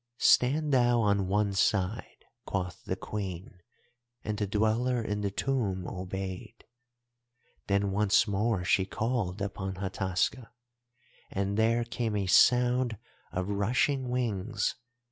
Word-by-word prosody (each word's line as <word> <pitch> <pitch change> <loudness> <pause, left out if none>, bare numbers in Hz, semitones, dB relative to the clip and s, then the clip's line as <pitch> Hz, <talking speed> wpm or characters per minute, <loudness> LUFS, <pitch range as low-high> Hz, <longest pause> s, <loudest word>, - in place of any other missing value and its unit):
"'Stand 145 +6 +3
thou 120 -2 +4
on 100 -3 +2
one 100 +1 +1
side,' 100 +1 -1 0.2
quoth 90 -3 -3
the - - -2
Queen, 95 -3 -6 0.6
and 105 -1 -3
the 105 - 0
Dweller 110 +4 +1
in 105 -2 -2
the 100 - 0
Tomb 100 -6 -1
obeyed. 95 +3 -6 1.0
"Then 100 0 +1
once 105 +1 +3
more 100 -1 0
she 95 +1 +3
called 105 -4 -2
upon 95 -1 -4
Hataska 95 +5 -2 0.8
and 100 +1 -2
there 115 +2 +2
came 115 -2 -3
a 100 -2 0
sound 125 +3 +4 0.3
of 90 +1 -2
rushing 125 +6 0
wings. 115 -4 -1
105 Hz, 120 wpm, -29 LUFS, 95-120 Hz, 1.0 s, thou